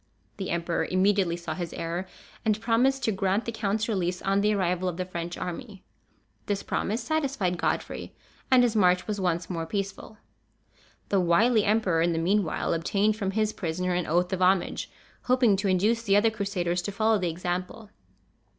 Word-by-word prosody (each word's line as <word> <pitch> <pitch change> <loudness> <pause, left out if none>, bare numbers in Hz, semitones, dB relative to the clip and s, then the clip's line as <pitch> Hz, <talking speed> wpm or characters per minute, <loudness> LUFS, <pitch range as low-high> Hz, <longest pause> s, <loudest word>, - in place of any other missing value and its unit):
The 190 - -4
emperor 170 0 -1
immediately 185 -2 +2
saw 170 -2 -5
his 175 0 -5
error, 170 +3 -4 0.4
and 215 -2 +1
promised 250 +4 +2
to 220 - +2
grant 195 +2 0
the 230 - -2
count's 215 -1 -1
release 180 -4 -1
on 195 +1 +2
the 210 +1 +3
arrival 185 -2 0
of 175 - -6
the 185 - -2
French 175 -1 -5
army. 195 +2 -6 0.6
This 200 -1 -1
promise 225 +3 -2
satisfied 265 - -1
Godfrey, - - -2 0.3
and 255 -1 +6
his 235 -2 +1
march 180 -3 +3
was 210 -2 -3
once 175 -2 0
more 165 -3 -4
peaceful. 195 +3 -4 0.9
The 200 - +3
wily 205 +6 +3
emperor, 200 -6 +2
in 170 0 +2
the - - -2
meanwhile, 180 +1 +1
obtained 200 +6 +1
from 200 -3 -2
his 215 +2 0
prisoner 180 0 -2
an 175 -1 -1
oath 175 +4 +1
of 185 - -2
homage, 185 0 +2 0.4
hoping 250 -5 +4
to 200 +1 -1
induce 205 +5 +2
the 200 -4 +2
other 220 +2 +4
Crusaders 190 -5 -1
to 205 - -4
follow 220 +1 +2
the 180 -2 0
example. 180 +5 -4
195 Hz, 180 wpm, -27 LUFS, 175-215 Hz, 0.9 s, and